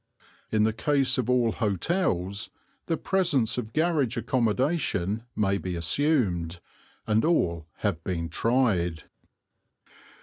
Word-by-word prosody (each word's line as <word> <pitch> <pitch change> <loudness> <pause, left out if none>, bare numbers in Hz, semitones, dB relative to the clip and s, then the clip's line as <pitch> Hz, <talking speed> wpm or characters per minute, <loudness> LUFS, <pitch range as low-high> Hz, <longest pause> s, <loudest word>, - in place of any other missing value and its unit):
In 110 -1 +3
the 110 0 +2
case 135 +3 +1
of 125 -1 -1
all 125 -2 +3
hotels 100 - -1 0.4
the 165 - 0
presence 150 - +1
of 110 -2 -6
garage 155 -6 +1
accommodation 115 - 0
may 100 -2 +1
be 90 +1 -4
assumed, 90 - 0 0.5
and 110 0 +2
all 85 - +1
have 90 -6 -1
been 85 -3 -2
tried. 90 - +1
110 Hz, 110 wpm, -27 LUFS, 90-135 Hz, 0.5 s, In